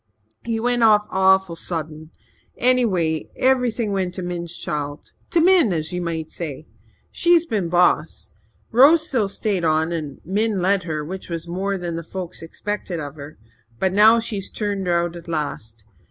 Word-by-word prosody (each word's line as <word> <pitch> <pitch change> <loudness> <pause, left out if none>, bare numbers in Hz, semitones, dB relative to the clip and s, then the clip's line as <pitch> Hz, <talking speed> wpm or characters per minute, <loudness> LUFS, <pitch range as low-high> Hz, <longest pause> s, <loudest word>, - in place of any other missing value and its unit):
He 230 -1 -2
went 245 +1 +1
off 210 -2 +5
awful 190 -2 +3
sudden. 160 -2 -5 0.5
Anyway, 195 -11 +1
everything 245 -4 +1
went 185 -2 -2
to 185 - -5
Min's 175 -1 -4
child 145 0 -5 0.2
to 340 - +2
Min 340 - +5
as 160 0 -2
ye 180 - -2
might 165 -2 -4
say. 155 -3 -6 0.5
She's 345 -1 +3
been 205 - -2
boss. 175 +1 +1 0.4
Rose 300 +7 +6
still 225 - 0
stayed 200 -3 -1
on 160 0 +2
there 170 -1 -1
and 150 -3 -8
Min 205 +3 0
let 190 +2 +2
her, 155 -3 -3
which 190 +4 -7
was 170 0 -5
more 195 +3 -2
than 170 -2 -4
folks 180 +1 -7
expected 180 +1 -5
of 145 -2 -6
her. 150 0 -11 0.4
But 210 - +5
she's 200 -4 -4
turned 200 -3 -3
her 170 -1 +2
out 175 0 -4
at 170 0 -10
last. 115 -9 -4
180 Hz, 165 wpm, -22 LUFS, 165-215 Hz, 0.5 s, Rose